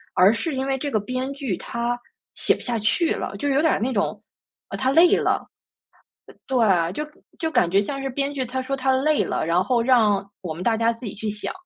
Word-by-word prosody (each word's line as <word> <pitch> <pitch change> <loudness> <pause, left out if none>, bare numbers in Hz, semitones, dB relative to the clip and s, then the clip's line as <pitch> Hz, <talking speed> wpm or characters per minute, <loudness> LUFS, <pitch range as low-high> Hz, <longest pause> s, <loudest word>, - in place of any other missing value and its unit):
而 190 +4 +6
是 295 +4 -3
因 265 +1 -1
为 270 0 0
这 285 +2 -3
个 215 - +1
编 255 +5 -3
剧 270 -9 -3
他 235 +1 -3 0.3
写 - - +2
不 - - -12
下 235 -3 -2
去 320 - +1
了， - - -3
就 285 - -1
有 275 +2 +3
点 320 - +3
儿 - - 0
那 250 +3 -1
种， 205 - -1 0.5
啊， - - -5
他 260 0 +1
累 335 +4 +6
了。 - - 0 0.8
呃， - - -15
对， 190 -9 +2
就 300 - -3 0.4
就 320 - -1
感 180 - +3
觉 195 +2 +4
像 275 +6 -4
是 270 - -2
编 275 +2 -2
剧 260 -2 -1
他 260 +2 -3
说 275 +1 -2
他 265 0 +1
累 300 +3 +2
了， - - -2
然 175 +2 +2
后 235 +2 +1
让 220 -6 +3 0.2
我 170 -3 -4
们 175 - -7
大 225 +2 +2
家 230 +1 +2
自 230 0 -9
己 200 - -5
去 215 +1 -5
想， 210 0 -5
250 Hz, 255 characters per minute, -23 LUFS, 210-275 Hz, 0.8 s, 而